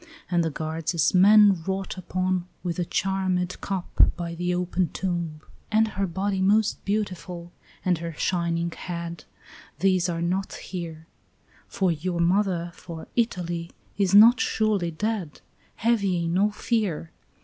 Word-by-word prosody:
And 175 -1 +3
the 160 - 0
guards 160 +2 -3
as 160 - +3
men 200 -1 +6
wrought 190 +2 -3
upon 185 -1 -1 0.2
with 175 -1 -3
a 175 - 0
charmèd 185 -1 -1
cup, 190 -3 +2
By 170 -1 -4
the 175 +1 -2
open 180 -1 0
tomb. 170 -4 -3 0.3
"And 220 +1 +3
her 195 -2 -2
body 190 +2 -1
most 210 +3 +2
beautiful, 180 -4 -3 0.3
and 180 -3 +2
her 165 0 -5
shining 170 0 -1
head, 170 -2 -6 0.5
These 185 -2 +2
are 170 -1 -2
not 185 +3 -1
here; 165 -3 -7 0.6
For 190 -2 +1
your 170 +2 -2
mother, 175 -1 +1
for 165 -3 -9
Italy, 175 -7 -1 0.3
is 200 -1 +2
not 230 +4 +8
surely 210 -5 +1
dead: 190 -1 -3 0.3
Have 230 -1 +2
ye 175 -3 0
no 190 +5 +2
fear. 205 -7 -2
180 Hz, 140 wpm, -25 LUFS, 170-195 Hz, 0.6 s, not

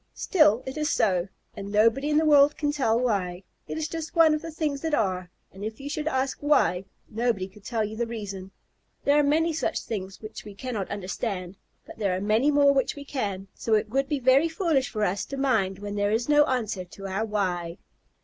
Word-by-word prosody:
Still, 280 - +3
it 265 +3 -6
is 300 -1 0
so, 185 -7 +1 0.3
and 200 -1 -7
nobody 230 +7 +3
in 300 - +2
the 315 - +3
world 290 -1 +5
can 290 -1 0
tell 240 -6 +1
why. 195 -7 -1 0.2
It - - -4
is 315 -1 -2
just 325 +1 -6
one 325 -2 +6
of 305 - -1
the 330 - -6
things 300 -3 -2
that 320 -2 0
are, 185 -6 -1 0.2
and 190 +2 -10
if 220 +1 -5
you 280 +1 -6
should 305 0 -3
ask 265 -2 -1
"Why?" 195 -11 +2 0.2
nobody 225 -4 -1
could 195 +1 -18
tell 220 +1 -1
you 215 +1 -6
the 235 +1 -2
reason. 200 -5 -6 0.5
There 285 +1 +4
are - - +4
many 320 +3 +2
such 320 +1 -1
things 195 -4 -5
which 215 - -9
we 205 -1 -10
cannot 220 -3 -4
understand, 195 -1 -4 0.3
but - - -12
there 195 -4 +1
are - - -2
many 215 +8 +2
more 285 -1 +5
which 270 -2 0
we 285 -1 -9
can, 200 -9 -3
so 225 - 0
it 210 - 0
would 270 +4 0
be 295 - +1
very 270 +5 +4
foolish 320 -6 0
for 215 -1 -2
us 195 0 0
to 275 - -6
mind 220 -9 +1
when 205 +1 -6
there 205 0 0
is 225 +3 0
no 295 0 +5
answer 220 -8 -2
to 195 +2 -11
our 195 +3 -2
"Why?" 180 -5 -2
230 Hz, 225 wpm, -26 LUFS, 200-290 Hz, 0.5 s, one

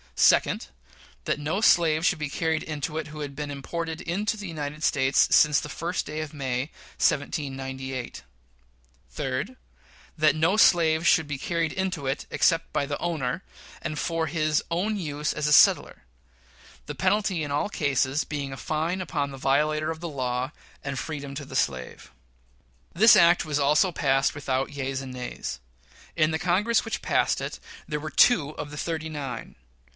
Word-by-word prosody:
Second. - - +3 0.6
That - - 0
no 155 +8 -1
slave 165 -5 +4
should - - +2
be 150 -1 -3
carried 160 +1 -1
into 150 0 -4
it 155 - -5
who 155 0 -9
had 140 -1 -5
been 150 0 -4
imported 160 +3 -4
into 205 +6 -1
the 205 -2 -6
United 150 -2 -5
States 135 -3 +3
since 150 -3 +5
the 150 - -7
first 170 +4 -3
day 155 +1 -4
of 155 -1 -6
May, 135 0 -3 0.3
1798. 135 -3 -2 0.9
Third. 140 - -3 0.6
That 155 0 +4
no 165 +6 +2
slave 165 -4 +4
should 160 -2 +4
be 145 -2 -3
carried 165 +1 -1
into 185 -6 -2
it 135 +2 -2
except 165 0 +2
by 140 - +1
the 145 +1 -4
owner, 165 -1 -2 0.4
and 155 -2 -4
for 165 +1 -1
his 155 -2 0
own 185 +6 0
use 150 -6 -2
as 150 0 -1
a 150 - +3
settler; - - +5 0.8
the - - -5
penalty 195 -6 +1
in 145 - -4
all 145 +8 0
the - - -9
cases 140 0 +1
being 145 -2 -4
a - - -7
fine 160 +6 -2
upon 150 -6 -2
the 135 - -8
violator 150 +3 +1
of 160 - -6
the 170 - -4
law, 130 -1 -2 0.3
and 135 -2 -3
freedom 140 -2 -5
to 140 0 -5
the 135 -1 -9
slave. 65 - -2 0.8
This 220 +6 +7
act 170 0 +5
also 150 +3 +3
was 180 - -7
passed 135 0 +2
without 135 -1 -1
yeas 135 -2 -3
and 130 -1 -8
nays. 125 - -5 0.6
In 155 -1 +3
the 160 - -1
Congress 205 +7 +2
which 225 - -3
passed - - +2
it - - -5 0.3
there 150 -1 -2
were 155 +1 -6
two 155 - +4
of 145 - -6
the 150 - -8
"thirty 160 0 -3
nine." 140 -6 -6
150 Hz, 175 wpm, -26 LUFS, 140-165 Hz, 0.9 s, This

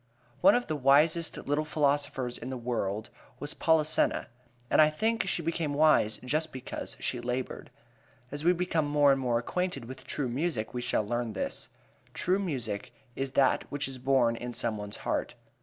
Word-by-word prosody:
One 295 - +7
of 245 - +1
the 155 - -2
wisest 150 +4 +3
little 145 +2 -1
philosophers 145 -4 0
in 125 - -6
the 130 - -4
world 110 -3 -3 0.3
was 145 - -3
Polissena, 160 -1 +2 0.4
and - - +5
I 155 - +6
think 220 +7 0
she 175 - 0
became 160 -2 -1
wise 150 -8 +4
just 155 +4 0
because 130 0 -6
she 125 - -2
labored. 125 +1 -4 0.6
As 145 +1 -5
we 175 - +5
become 170 -4 0
more 145 -1 +4
and 135 0 +1
more 120 -2 +1
acquainted 140 +1 -2
with 130 +3 -9
true 140 -3 -2
music 125 -3 -2
we 125 - -3
shall 120 -3 0
learn 120 0 -2
this: 95 - -4 0.5
True 185 +2 +1
music 125 - -4 0.2
is 135 0 -3
that 135 - +2
which 140 -1 -1
is 130 -1 -7
born 125 -3 +3
in 120 +1 -6
some 115 -1 -1
one's 105 -1 -6
heart. - - -1
135 Hz, 175 wpm, -29 LUFS, 120-155 Hz, 0.6 s, One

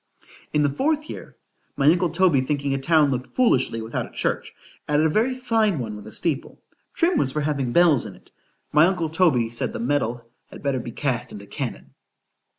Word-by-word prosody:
In 150 - +2
the 145 - +3
fourth 300 - -1
year, - - -10 0.4
my 140 - +1
uncle 170 +3 +4
Toby 165 -4 +3
thinking 140 +1 -1
a 135 - -1
town 150 0 +3
looked 125 -1 -4
foolishly 130 - +2
without 115 - -3
a - - -15
church, - - -2 0.4
added 150 +1 +2
a - - +3
very 230 +10 +1
fine 225 -7 +1
one 110 -5 -4
with 105 0 -10
a - - -9
steeple.——Trim 235 - -2
was 135 - +1
for 150 - -1
having 140 -4 -1
bells 160 -7 +4
in 100 - -10
it;——my 155 +3 -1
uncle 180 -4 -1
Toby 150 -9 +2
said, 115 - -2
the - - -5
metal 120 -2 -1 0.2
had - - -12
better 140 -2 0
be 120 - -6
cast 125 -2 -2
into 100 -1 -9
cannon. - - -6
145 Hz, 190 wpm, -23 LUFS, 125-175 Hz, 0.4 s, uncle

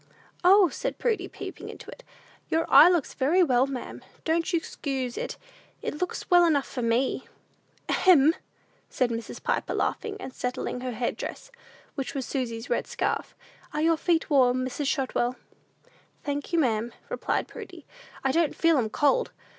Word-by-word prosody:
"O," 380 +1 +7
said - - -4
Prudy, 430 -6 0
peeping - - -8
into - - -10
it, - - -13 0.5
"your 325 +1 +1
eye 330 - +10
looks 345 -6 +1
very 315 +7 +3
well, 260 -4 +3
ma'am; 270 -2 -6 0.2
don't 330 +2 +1
you 340 - +2
'xcuse 265 -6 -4
it; - - -4 0.5
it 300 - -4
looks 360 - -3
well 350 -1 +6
enough 300 -5 +3
for 255 - -5
me." 235 +3 0 0.6
"Ahem!" 320 -4 +5 0.6
said 250 -2 0
Mrs. 230 0 -6
Piper, - - -1
laughing, 425 -2 -2
and 265 - -7
settling 250 0 -3
her 250 -1 -3
head 235 +2 -2
dress, - - -7 0.4
which 270 -1 -4
was 270 -2 -2
Susy's 235 -4 -3
red 240 - -1
scarf: - - -2 0.4
"are 300 - 0
your 330 0 +4
feet 325 +1 +1
warm, 255 -3 +3
Mrs. 275 +2 -3
Shotwell?" 255 -3 0 0.9
"Thank 285 +2 -3
you, 340 - +1
ma'am," 235 -5 +1 0.2
replied - - -1
Prudy, - - -10 0.4
"I 270 - +2
don't 325 0 +1
feel 330 -4 +3
'em 220 -3 0
cold. 295 - +2
280 Hz, 160 wpm, -27 LUFS, 250-335 Hz, 0.9 s, eye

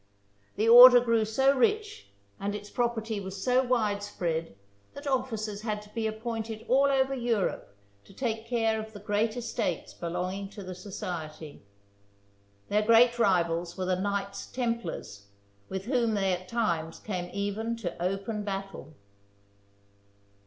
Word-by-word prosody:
The 215 +2 +1
order 245 +1 +11
grew 230 -2 +2
so 265 +6 +3
rich 415 - 0 0.3
and 205 +1 -2
its 205 0 -8
property 230 -3 -1
was 190 0 -6
so 255 +1 +3
widespread 205 - -1 0.4
that 285 - -9
officers 225 -6 -2
had 215 -2 -2
to 210 - -18
be 225 -1 -1
appointed 220 0 -5
all 270 +2 +4
over 270 -1 +2
Europe 230 - -2 0.3
to - - -16
take 225 -3 -3
care 225 -2 +1
of 220 0 -8
the 205 - -9
great 210 +3 0
estates 230 -7 -3
belonging 180 +3 -4
to 205 0 -9
the 185 0 -6
society. 165 -5 -7 1.1
Their 210 +1 +2
great 235 +2 +5
rivals 175 -4 +1
were 185 - -2
the 185 0 +1
Knights 200 0 -3
Templars, 230 - -4 0.4
with 190 0 -4
whom 235 -3 +1
they 195 -2 +1
at 180 +1 -5
times 170 -8 -1
came 180 -4 -5
even 205 +3 -2
to 180 -7 -6
open 195 +3 -2
battle. 195 -7 -6
210 Hz, 140 wpm, -28 LUFS, 190-235 Hz, 1.1 s, order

